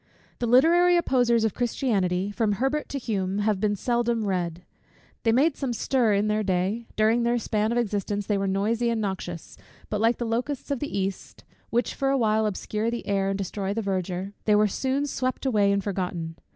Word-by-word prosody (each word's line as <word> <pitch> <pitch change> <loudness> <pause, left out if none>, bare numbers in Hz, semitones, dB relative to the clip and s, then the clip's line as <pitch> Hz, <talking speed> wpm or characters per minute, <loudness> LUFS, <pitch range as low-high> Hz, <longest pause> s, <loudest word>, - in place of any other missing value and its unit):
The 240 - -1
literary 345 +8 +5
opposers 245 -8 +2
of 220 - +1
Christianity, 200 -6 0
from 210 -1 0
Herbert 270 +8 -1
to 280 - -3
Hume, 195 -6 -2
have 205 -1 +1
been 205 0 +1
seldom 235 0 0
read. 175 -3 -2 0.6
They 225 - +2
made 275 +6 +3
some 265 -4 -2
stir 235 -2 +1
in 205 +1 +1
their 215 0 +1
day: 195 +4 -1
during 220 +2 +3
their 235 +1 +2
span 215 -1 0
of 235 - 0
existence 205 -3 -1
they 205 - 0
were 195 - -1
noisy 220 +5 +1
and 230 -1 0
noxious; 190 -5 -5 0.3
but 210 -1 -1
like 230 +2 +3
the 240 - -3
locusts 250 +5 -2
of 280 - 0
the 290 -6 -3
east, 195 -1 -4 0.3
which 240 +1 0
for 270 - -1
a 275 - +2
while 220 -2 +2
obscure 210 +2 -2
the 235 0 -4
air, 195 -1 0
and 195 - -1
destroy 195 +1 -3
the 225 - -1
verdure, 190 0 -3
they 210 - +4
were 210 0 +4
soon 265 +7 -1
swept 255 -1 -2
away 210 -6 +3
and 200 0 +1
forgotten. 180 -4 -3
215 Hz, 200 wpm, -26 LUFS, 195-240 Hz, 0.6 s, literary